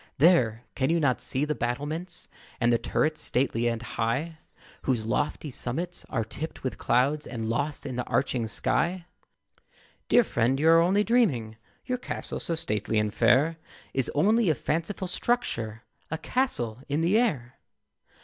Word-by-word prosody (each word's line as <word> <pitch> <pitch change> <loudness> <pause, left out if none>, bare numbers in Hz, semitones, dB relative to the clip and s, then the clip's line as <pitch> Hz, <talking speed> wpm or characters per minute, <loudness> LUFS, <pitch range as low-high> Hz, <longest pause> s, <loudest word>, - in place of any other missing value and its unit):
There! 130 -8 +4
can 130 +1 0
you 170 +1 +3
not 135 -5 +1
see 135 +3 0
the 150 - 0
battlements; 145 +8 -4 0.3
And 120 0 +3
the 115 - +3
turrets 155 +6 0
stately 120 -2 +1
and 115 0 -1
high, 130 +9 -2 0.4
Whose 120 -5 0
lofty 145 +5 -1
summits 165 +9 -3
are 115 - 0
tipped 145 +8 -7
with 130 - -3
clouds, 140 +5 +2
And 115 -3 -4
lost 145 +6 -2
in 130 -2 -4
the 125 - 0
arching 125 -4 0
sky? 170 - 0 1.0
Dear 245 - +6
friend, 125 - +1
you 160 +2 +4
are 165 0 +7
only 190 +5 +3
dreaming, 155 - +2 0.3
Your 250 -1 -2
castle - - -4
so 165 - -2
stately 110 -8 -1
and 105 -1 +1
fair 150 +8 +3 0.4
Is 135 -2 0
only 215 +6 +4
a 155 - +3
fanciful 170 +7 -2
structure, 115 - -2 0.3
A 160 - -2
castle 125 - -1
in 145 +3 +1
the 185 +7 +3
air. 140 - -1
140 Hz, 160 wpm, -27 LUFS, 120-165 Hz, 1.0 s, are